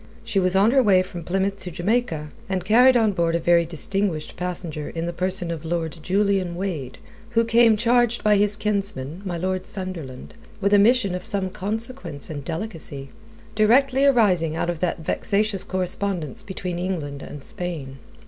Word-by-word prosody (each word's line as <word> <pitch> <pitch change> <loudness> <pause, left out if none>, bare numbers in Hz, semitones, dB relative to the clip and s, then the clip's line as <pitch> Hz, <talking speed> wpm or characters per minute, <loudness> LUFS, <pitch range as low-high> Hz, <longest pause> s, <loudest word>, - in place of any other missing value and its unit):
She 215 -4 0
was 185 0 +1
on 200 +4 +5
her 270 +1 +5
way 190 -6 +4
from 180 -1 -8
Plymouth 195 +3 -1
to 185 - -6
Jamaica, 175 -4 -1 0.2
and 185 -2 -2
carried 250 +5 +6
on 220 -3 +3
board 170 -3 0
a - - +1
very 170 0 +3
distinguished 175 0 -1
passenger 170 -4 -4
in 165 0 -4
the 170 - -3
person 180 -1 -1
of 165 -2 -5
Lord 165 0 -3
Julian 190 -1 +1
Wade, 170 -9 -4 0.4
who 230 - +5
came 230 -1 +5
charged 240 +1 +2
by 210 -1 +5
his 205 0 +2
kinsman, 195 -7 -3
my 175 -2 -3
Lord 185 +1 -2
Sunderland, 170 -10 -7 0.3
with 200 0 +1
a 205 - +7
mission 220 -2 +4
of 180 0 -4
some 195 -3 -2
consequence 210 - -4
and 145 -2 -5
delicacy, 160 -5 -5 0.4
directly 255 +5 +4
arising 195 - +3
out 170 +1 0
of 170 - -7
that 175 -1 -1
vexatious 205 0 0
correspondence 185 -4 -2
between 185 -3 -5
England 155 -7 -3
and 145 -2 -9
Spain. 150 -7 -5
185 Hz, 170 wpm, -23 LUFS, 170-210 Hz, 0.4 s, a